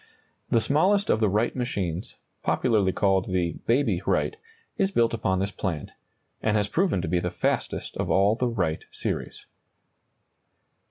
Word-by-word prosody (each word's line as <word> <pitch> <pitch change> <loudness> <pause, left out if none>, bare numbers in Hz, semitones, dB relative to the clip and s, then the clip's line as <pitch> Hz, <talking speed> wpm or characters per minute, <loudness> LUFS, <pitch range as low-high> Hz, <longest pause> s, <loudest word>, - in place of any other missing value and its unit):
] - - -43
The 115 - +3
smallest 185 - +2
of - - +2
the 110 -2 +3
Wright 105 +5 +1
machines, 100 -8 -3 0.3
popularly 105 -6 +2
called 95 -1 +1
the 90 -2 -1
"Baby 130 +5 +2
Wright," - - +1 0.4
is 195 - +1
built 120 -12 +2
upon 95 -5 0
this 100 +2 -1
plan, 85 -7 -4 0.5
and 110 0 +2
has 105 -1 +1
proven 160 - +1
to - - -2
be 90 +2 +1
the 90 - -2
fastest 90 - -2
of - - -2
all 100 +2 +4
the 125 +2 0
Wright 90 -9 -1
series. - - -3
105 Hz, 160 wpm, -26 LUFS, 95-120 Hz, 0.5 s, all